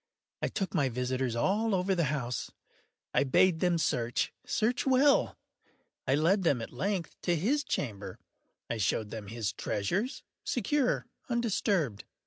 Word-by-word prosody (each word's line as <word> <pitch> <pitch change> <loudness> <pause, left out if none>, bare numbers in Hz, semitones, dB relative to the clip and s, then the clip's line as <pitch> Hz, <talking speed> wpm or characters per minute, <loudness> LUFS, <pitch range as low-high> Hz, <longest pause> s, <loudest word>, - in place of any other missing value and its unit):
I - - +1
took 195 -2 -3
my 145 -7 +2
visitors 125 0 -1
all 205 - +2
over 190 +1 +1
the 170 -3 +2
house. 125 -5 -2 0.6
I - - +4
bade 160 +5 +4
them 175 -1 +2
search—search 160 - 0
well. 270 +2 +4 0.7
I 130 - +4
led 170 +7 +3
them, 145 -8 +2
at 115 - -7
length, 180 +6 -2
to 175 - +1
his 255 - +1
chamber. 105 - -3 0.5
I 115 - -2
showed 105 +1 0
them 110 -3 -6
his 110 -2 -2
treasures, 180 - -2 0.2
secure, 255 +3 +1 0.2
undisturbed. 200 - 0
165 Hz, 135 wpm, -30 LUFS, -, 0.7 s, I